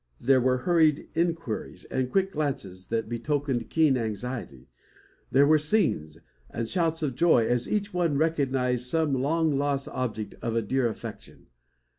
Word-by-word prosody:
There 130 0 +4
were 130 +1 +2
hurried 155 +1 +2
inquiries, 165 -8 -2
and 130 -1 -2
quick 195 0 +1
glances, 135 - -4
that 115 -1 -1
betokened 130 +1 -2
keen 155 -5 +3
anxiety. 110 - -5 0.6
There 140 +2 +5
were 155 +1 +5
"scenes" 145 - +1 0.3
and 115 0 -4
shouts 165 +1 0
of 140 -4 -1
joy, 130 -5 +4
as 120 +1 0
each 205 -2 -1
one 170 -5 +1
recognised 130 -5 0
some 160 +1 +1
long 145 +2 +1
lost 140 -1 -1
object 110 -4 -4
of 115 -1 -2
a 115 - +1
dear 130 +3 +1
affection. 110 - -9
135 Hz, 150 wpm, -27 LUFS, 120-160 Hz, 0.6 s, There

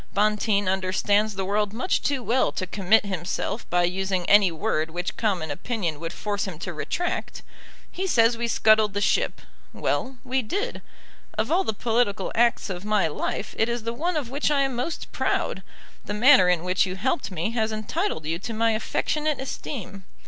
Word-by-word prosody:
Bonteen 210 -1 +2
understands 195 +3 +1
the 190 -1 -2
world 205 +1 0
much 255 +11 0
too 275 -3 -1
well 240 +4 +2
to 185 - -2
commit 195 +3 +3
himself 190 +4 -3
by 175 0 +2
using 185 0 -1
any 200 -3 +6
word 160 0 -1
which 175 +2 -4
common 185 -9 -1
opinion 170 -3 -3
would 165 +1 -4
force 205 +1 -2
him 180 -5 -6
to 175 +2 -5
retract. 350 - -3 0.5
He 380 +2 -3
says 230 -7 +4
we 235 0 -2
scuttled 215 -2 +4
the - - +1
ship. 205 - +1 0.3
Well; 260 0 -2
we 260 +1 0
did. 405 - -3 0.6
Of 220 +6 0
all 365 +3 +3
the - - 0
political 225 -1 0
acts 235 0 +2
of 185 -2 -5
my 210 -4 +2
life 160 +6 -3
it 225 - +3
is 235 -1 -2
the 230 +1 -2
one 335 +6 -1
of 260 -5 -3
which 285 +3 0
I 290 -2 +3
am 270 -2 0
most 250 +7 -4
proud. - - -1 0.4
The 205 - -3
manner 215 -5 +7
in 175 -2 +2
which 185 +2 +2
you 185 - -4
helped 260 - -1
me 185 +3 -2
has 220 -2 0
entitled 215 - -2
you 165 +2 -2
to 225 +4 -5
my 225 +1 +2
affectionate 300 +7 -1
esteem. 210 -7 -6
215 Hz, 185 wpm, -25 LUFS, 185-245 Hz, 0.6 s, manner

